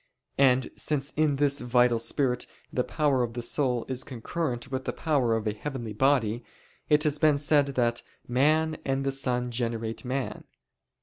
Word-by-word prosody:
And 130 -2 +4
since 145 -2 -1
in 150 -2 +1
this 140 0 +1
(vital) 120 -1 +3
spirit 125 +1 0 0.3
the 125 - +1
power 145 -3 +1
of 120 -1 -2
the 120 - -3
soul 125 -1 0
is 130 -1 -2
concurrent 130 0 -4
with 130 0 -3
the - - -2
power 135 -8 +1
of 110 -1 -2
a 105 - 0
heavenly 120 -1 -5
body, 120 -2 +2 0.5
it 150 -1 +4
has 150 -1 0
been 150 -2 +4
said 145 0 +3
that 120 -1 +1 0.3
"man 155 +5 +2
and 135 0 -1
the 135 - +1
sun 125 -2 -1
generate 115 -2 -3
man." 130 0 -3
130 Hz, 170 wpm, -27 LUFS, 120-145 Hz, 0.5 s, And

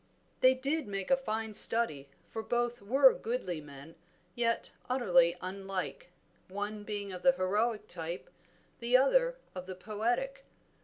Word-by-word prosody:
They 255 0 +6
did 275 +2 -1
make 195 +2 -4
a - - +8
fine 220 -4 -3
study, 175 -12 +2 0.2
for 225 - -3
both 240 +1 -1
were 260 +6 +6
goodly 190 -9 -3
men 145 +2 -12 0.4
yet 230 +1 0 0.2
utterly 175 -9 +4
unlike, 195 - -5 0.4
one 205 +2 -4
being 205 -1 -4
of 180 -1 -7
the 265 - +5
heroic 210 +1 0
type, 170 0 -5 0.5
the 240 +1 +4
other - - +3 0.2
of 185 0 -7
the 185 - -6
poetic. 240 - -2
215 Hz, 140 wpm, -32 LUFS, 185-255 Hz, 0.5 s, a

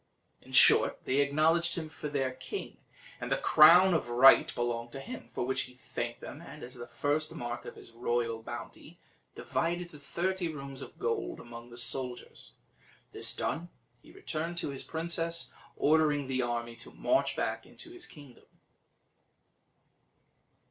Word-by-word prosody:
In - - -16
short, - - +6
they 130 - +1
acknowledged 155 +5 +2
him 160 -2 -3
for 155 -1 -6
their 135 -3 0
king, 130 0 -7 0.4
and - - -5
that - - +4
the - - -6
crown 175 +5 +8
of 155 -7 0
right 125 +3 +7
belonged 120 0 -2
to 135 - -6
him, 250 - -8
for - - -3
which 130 +1 0
he 125 - -17
thanked 120 -1 -5
them, 145 - -8
and, 150 -3 -11
as 125 - -8
the 120 -2 -8
first 150 +2 -1
mark 120 0 -5
of - - -8
his - - -13
royal 115 -1 -1
bounty, - - -9 0.4
divided 175 +1 -2
the 150 - -12
thirty 175 +5 -2
rooms 140 -2 -7
of - - -10
gold 415 -5 -2
among 120 0 -10
the 120 - -11
soldiers. 125 +1 -3 0.6
This - - 0
done, 170 +2 -2 0.3
he - - -17
returned 170 - -4
to 170 - -2
his 135 - -3
princess, 165 0 -2 0.2
ordering 150 -2 +3
the 130 -1 -1
army 120 -1 -3
to 115 - -7
march 325 - +1
back - - -2
into 340 - -12
his 355 0 -9
kingdom. 145 -6 -15
145 Hz, 160 wpm, -31 LUFS, 120-170 Hz, 0.6 s, crown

